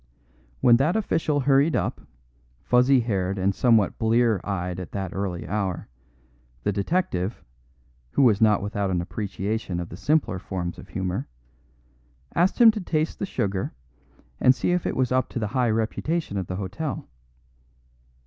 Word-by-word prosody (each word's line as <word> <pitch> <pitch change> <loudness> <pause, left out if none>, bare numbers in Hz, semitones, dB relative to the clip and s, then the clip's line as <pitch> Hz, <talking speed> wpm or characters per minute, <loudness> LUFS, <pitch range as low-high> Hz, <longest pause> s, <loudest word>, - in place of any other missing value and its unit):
When 120 -1 +6
that 150 - +1
official 160 -8 0
hurried 140 +3 +3
up, - - -1 0.6
fuzzy 125 +1 +4
haired 100 -4 -1
and 95 +1 +1
somewhat 115 -1 +3
blear 115 -3 +2
eyed 90 -2 -3
at 90 - -8
that 95 -3 -4
early 95 -3 -3
hour, 95 -3 -2 0.7
the 105 - +1
detective 100 - -1 0.7
(who - - +3
was 115 -4 +4
not 105 -2 +4
without 100 -1 -2
an 90 -2 0
appreciation 100 0 -3
of 85 - -5
the - - -8
simpler 110 - +1
forms 90 -2 -5
of - - -12
humour) 95 -1 -3 1.1
asked 180 +7 +2
him 235 -2 +9
to 215 -1 -5
taste 155 -3 -1
the 195 - -2
sugar 100 - -2 0.7
and 130 - +5
see - - 0
if 180 -1 0
it - - -2
was 130 -1 +1
up 130 -1 +1
to - - -6
the 110 -3 -1
high 125 -3 +2
reputation 115 +6 -1
of 95 -3 -2
the 90 - -4
hotel. 105 +11 -4
110 Hz, 160 wpm, -25 LUFS, 95-135 Hz, 1.1 s, him